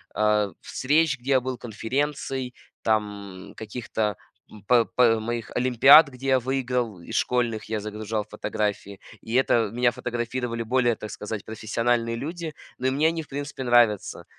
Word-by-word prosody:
а, 105 -1 +2
встреч, 150 0 +1
где 130 +3 -3
я 130 -2 +4
был, 130 -1 -4
конференций, 130 +2 -3 0.3
там 105 -4 -2
каких-то, 110 -2 -3 0.4
м, 105 - -13
п 120 +2 +4
п 115 -2 +3
моих 115 +1 -4
олимпиад, 130 +5 +7
где 130 0 -8
я 130 -1 +4
выиграл, 125 -5 -2
из 85 - -8
школьных, 120 -3 0
я 110 -1 -1
загружал 105 0 -4
фотографии. 105 -2 -3 0.2
И 110 - -7
это 120 -4 +3
меня 120 +1 +2
фотографировали 120 -1 -3
более, 120 0 +2
так 110 -2 -8
сказать, 105 0 -6
профессиональные 115 +2 -1
люди. 165 +3 -5 0.2
Но 130 - -1
и - - +4
мне 145 +4 +2
они, 165 0 -1
в - - -21
принципе, 140 -1 -5
нравятся. 120 -5 +2
120 Hz, 155 wpm, -25 LUFS, 110-130 Hz, 0.4 s, олимпиад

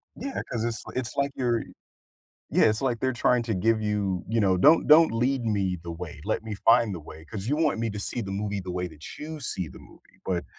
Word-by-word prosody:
Yeah, 270 +4 -4
'cause 115 -2 -1
it's 115 -1 -2
li - - -9
it's 130 -2 -3
like 140 0 +1
you're 120 -3 0 0.9
Yeah, - - +4
it's 110 0 +3
like 125 -4 0
they're 130 +2 0
trying 120 0 +2
to 115 - -2
give 110 +4 +2
you, 100 -3 -1
you 115 +1 +1
know, 95 -2 +3
"Don't 155 - +5
don't 155 -2 +7
lead 125 +2 0
me 100 -4 0
the 85 - -5
way, 80 -3 -7
let - - -1
me 110 -2 -5
find 115 0 +4
the 85 - -5
way, 80 +1 -12
'cause 100 +5 -6
you 145 +4 +1
want 155 -8 +2
me 115 -1 -1
to 105 - -6
see 120 +4 -3
the 95 - -6
movie 100 0 -2
the 90 - -5
way 90 0 -2
that 80 -2 -11
you 155 +1 -6
see 95 - -2
the - - -12
movie, - - -19
but, 90 -2 -1
110 Hz, 250 wpm, -26 LUFS, 95-125 Hz, 0.9 s, don't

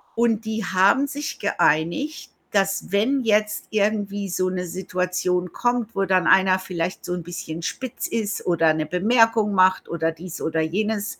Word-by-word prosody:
und 230 -1 +1
die 220 0 -3
haben 195 +9 +3
sich 290 +1 -5
geeinigt, 185 - 0 0.2
dass 195 -1 0
wenn 255 +7 +2
jetzt 210 -1 +1
irgendwie 205 -1 -1
so 185 +1 0
'ne 180 0 -3
Situation 180 0 -2
kommt, 240 0 -1
wo 195 0 +1
dann 185 -2 +2
einer 190 -1 +5
vielleicht 180 -1 -4
so 180 - -3
'n 175 -2 -4
bisschen 170 -1 -6
spitz 255 +8 -4
ist 210 -3 -3
oder 165 -2 +3
'ne 155 0 -2
Bemerkung 220 +4 +3
macht 185 0 +3
oder 165 -1 -1
dies 170 +1 -8
oder 160 0 0
jenes 205 +5 -2
190 Hz, 160 wpm, -23 LUFS, 180-220 Hz, 0.2 s, einer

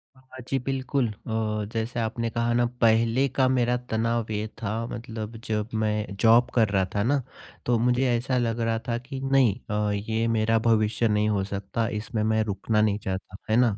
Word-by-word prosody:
हाँ, 130 - -22
हाँ, 130 - -10
जी, 135 - 0
बिल्कुल 130 0 -1
अ, 110 0 -3
जैसे 115 +2 -2
आपने 115 +1 -1
कहा 115 0 0
ना 120 0 +3 0.2
पहले 115 +4 +4
का 130 0 +2
मेरा 125 -1 +2
तनाव 115 0 0
ये 105 +1 -2
था 100 - -2 0.2
मतलब 115 -2 -6
जब 105 0 -2
मैं 105 -2 -1
जॉब 115 +1 +6
कर 110 -3 +4
रहा 95 -2 +2
था 100 - +2
ना, 140 +3 +2 0.4
तो 120 -1 +2
मुझे 125 +2 +2
ऐसा 125 +2 0
लग 115 -1 0
रहा 115 -1 0
था 115 0 0
कि 130 +2 -7
नहीं 135 -6 +4 0.2
अ, 105 0 0
ये 110 +3 -1
मेरा 115 0 +2
भविष्य 110 0 +2
नहीं 105 0 +2
हो 100 -2 +1
सकता, 100 +3 -3
इसमें 105 0 -3
मैं 110 0 +2
रुकना 105 +1 0
नहीं 105 -1 +2
चाहता, 95 0 -5
है 110 - +3
ना? 120 -5 +3
115 Hz, 195 wpm, -26 LUFS, 105-120 Hz, 0.4 s, जॉब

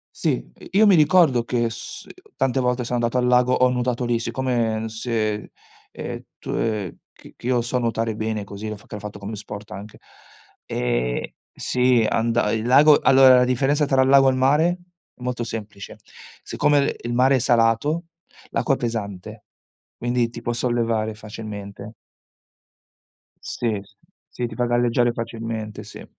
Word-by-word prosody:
Sì, - - -1
ehm, - - -13
io 210 +2 +5
mi 195 - +6
ricordo 155 -6 +4
che 120 -1 0
s 115 - -9
ehm, - - -12 0.2
tante 135 0 0
volte 125 0 0
sono 120 +1 -3
andato 120 +2 0
al 125 - +1
lago 125 0 +4
ho 125 0 +4
nuotato 125 0 -1
lì. 120 -1 +1
Siccome 115 -2 -1
se, 110 -2 -3 0.4
ehm, - - -6 0.2
tu - - -10
ehm, 105 -6 -2 0.2
che - - -16
che - - -8
io 125 -1 +2
so 120 +2 -2
nuotare 115 -2 -1
bene 110 -1 -3
così, 100 +2 -7
l'ho 105 - -4
f 105 - -20
che - - -8
l'ho 105 - -8
fatto 105 0 -8
come 105 +2 -6
sport 105 +1 -9
anche. 100 +3 -9 0.7
Ehm, - - -1 0.3
sì, 125 -2 +2
anda 115 -1 +1
il 110 0 -1
lago 145 +4 +7
allora, 130 -1 +7
la 125 - +5
differenza 135 +4 +1
tra 135 -2 +2
il 130 - +2
lago 135 0 +6
e - - +3
il 130 - -2
mare 150 +7 +2 0.4
molto 125 -1 -3
semplice: 110 -3 -7 0.4
siccome, 145 -1 +1
ehm, - - -9
il 120 0 -4
mare 130 +2 +4
è - - +2
salato, 120 +8 +2 0.4
l'acqua 150 - 0
è - - 0
pesante, 105 -6 -5 0.5
quindi 120 0 0
ti - - -8
può 120 - -2
sollevare 115 -2 -1
facilmente. 105 -1 -8 1.5
Sì, 110 -4 -2
sì, 100 0 -24 0.3
sì, 120 - -4
ti - - -9
fa 120 - 0
galleggiare 120 0 +2
facilmente, 115 -2 -5
sì. 105 - -11
120 Hz, 170 wpm, -22 LUFS, 110-125 Hz, 1.5 s, lago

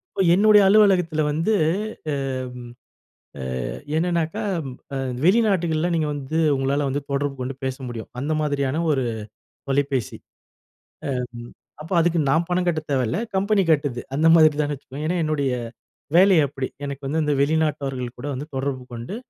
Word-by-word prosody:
இப்போ 195 - +2
என்னுடைய 210 +2 +6
அலுவலகத்தில 190 -6 +4
வந்து 165 +8 0 0.6
அம், 135 -1 -2 1.1
அ - - -5 0.6
என்னன்னாக்கா, 170 +3 0 0.5
அ - - -1 0.3
வெளிநாடுகள்ல 180 -5 +2
நீங்க 160 -2 +1
வந்து 145 +2 -4 0.2
உங்களால 140 +2 0
வந்து 140 +2 -2
தொடர்பு 140 0 -1
கொண்டு 130 +2 -3
பேச 130 0 -2
முடியும். 115 -2 -7
அந்த 145 +4 -1
மாதிரியான 145 0 0
ஒரு 135 -3 +1 0.7
தொலைபேசி. 135 -3 -1 1.0
அம் 120 -1 -7 0.3
அப்ப 160 - -9
அதுக்கு 170 0 +2
நான் 165 +4 +2
பணம் 180 0 +1
கட்டத் 155 -2 -2
தேவல்ல. 130 - 0 0.2
கம்பெனி 200 +1 +2
கட்டுது. 145 -5 0 0.2
அந்த 155 +3 +2
மாதிரி 155 -2 +6
தாங்க 145 0 -2 0.3
ஏன்னா, 175 +3 0
என்னுடைய 145 -3 0 0.7
வேலை 190 +1 +6
அப்பிடி. 135 -1 -4 0.2
எனக்கு 140 0 -6
வந்து 155 +4 0
இந்த 150 -1 +1
வெளிநாட்டவர்கள் 140 -5 -1
கூட 125 - -6
வந்து 140 +4 -6
தொடர்பு 135 -1 -2
கொண்டு 120 - -6
150 Hz, 140 wpm, -23 LUFS, 135-170 Hz, 1.1 s, என்னுடைய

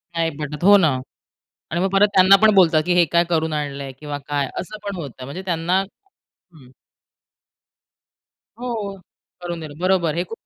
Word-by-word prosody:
नाही 165 -1 +1
भेटत, 150 +1 -6
हो 205 +2 +7
ना. 165 -6 +3 0.8
आणि 170 +2 -1
मग 190 - +1
परत 195 +1 +4
त्यांना 185 +1 +7
पण 220 -1 +6
बोलतात 165 -5 +4
की, 180 - +1
हे 175 -1 +4
काय 170 0 +4
करून 160 -2 0
आणलंय? 140 -2 -4
किंवा 145 -1 -5
काय 145 -2 -1
असं 215 +4 -7
पण 200 -1 -4
होतं 135 -6 -8
म्हणजे 140 +8 -7
त्यांना 175 +1 0 0.5
हं. 155 -8 -21 1.9
हो, 220 -5 -4 0.5
करून 175 -1 -5
देणं. 150 -2 -9
बरोबर, 180 -4 +1
हे 175 - 0
खूप 225 - -7
170 Hz, 165 wpm, -21 LUFS, 150-190 Hz, 1.9 s, हो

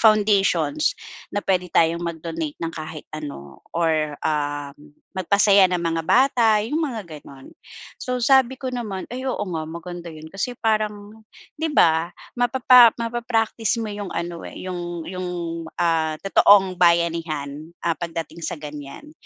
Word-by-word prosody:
foundations 215 - +3 0.3
na 205 - -3
puwede 180 -1 +1
tayong 165 +1 +2
mag-donate 165 -2 -4
ng 165 0 -4
kahit 155 -1 -7
ano 105 - -8
or, 155 -3 0
um, 145 -1 -3 0.2
magpasaya 195 +1 +4
ng 180 - 0
mga 165 -1 -1
bata 235 -5 +4
yung 300 +8 -1
mga 240 - -3 0.2
ganon. 135 -1 -14 0.5
So, 250 0 -2
sabi 260 +1 +4
ko 260 -1 -5
naman, 215 -6 -4
"Ay, 260 +1 -3
oo 210 - -2
nga 165 -4 -3
maganda 170 +1 -7
yun 155 -1 -10
kasi 245 +5 -3
parang" 215 -1 -2 0.4
'di 320 - 0
ba, 165 - +3 0.2
mapapa 245 -1 +6
mapa-practice 230 -1 -1
mo 220 -2 -3
yung 205 -2 -5
ano, 170 0 -4
eh, - - -12
yung 175 -2 -5
yung, 185 0 -5 0.5
ah, 160 -2 +1
totoong 190 -2 +5
bayanihan, 165 -4 +1 0.2
ah, 170 - +2
pagdating 165 0 -6
sa 165 - -3
ganyan. 150 - -9
180 Hz, 140 wpm, -23 LUFS, 160-225 Hz, 0.5 s, mapapa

